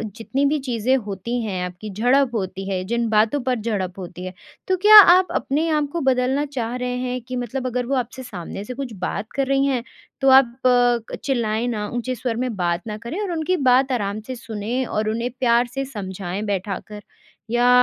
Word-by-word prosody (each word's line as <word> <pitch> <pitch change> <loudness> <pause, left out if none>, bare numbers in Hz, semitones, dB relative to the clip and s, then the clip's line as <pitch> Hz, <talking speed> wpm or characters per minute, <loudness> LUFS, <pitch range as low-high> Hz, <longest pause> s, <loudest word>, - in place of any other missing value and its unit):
जितनी 260 +5 -1
भी 295 +2 +2
चीज़ें 245 +1 +1
होती 210 +5 -3
हैं। 185 -4 -3
आपकी 180 +4 -8
झड़प 245 +6 +2
होती 195 -2 -3
है? 185 -1 -1
जिन 235 +3 -1
बातों 220 +5 +3
पर 255 -1 +1
झड़प 200 -5 -3
होती 180 0 -7
है? 185 - -6 0.3
तो 375 - +2
क्या 430 0 +11 0.2
आप 370 0 +4
अपने 300 +4 0
आप 300 -2 +1
को 340 - -1
बदलना 265 +2 +1
चाह 245 -4 -4
रहे 250 0 -2
हैं? 250 0 -3
कि 255 +2 -7
मतलब 255 +1 -3
अगर 250 0 -2
वो 275 +3 -1
आपसे 255 +1 -3
सामने 195 -3 -7
से 250 - -6
कुछ 250 -3 -6
बात 205 +3 -3
कर 275 0 0
रही 275 0 +2
हैं। 260 -4 0 0.4
तो 270 - +4
आप 260 -3 +6 0.6
अ, - - 0
चिल्लाएँ 235 -4 0
ना, 210 -3 -2
ऊँचे 245 +1 -3
स्वर 240 0 -3
में 240 -4 -3
बात 175 -1 -1
ना 210 - -4
करें। 235 - -6
और 395 -4 -2
उनकी 335 +3 0
बात 265 -1 +3
आराम 205 -4 -1
से 260 - -4
सुनें 230 +2 -3
और 215 -2 -1
उन्हें 230 +3 -1
प्यार 240 -1 +3
से 275 +1 -2
समझाएँ 195 -5 -5
बैठाकर। 205 +1 -4 0.5
या 240 +1 +3
240 Hz, 205 wpm, -22 LUFS, 210-265 Hz, 0.6 s, क्या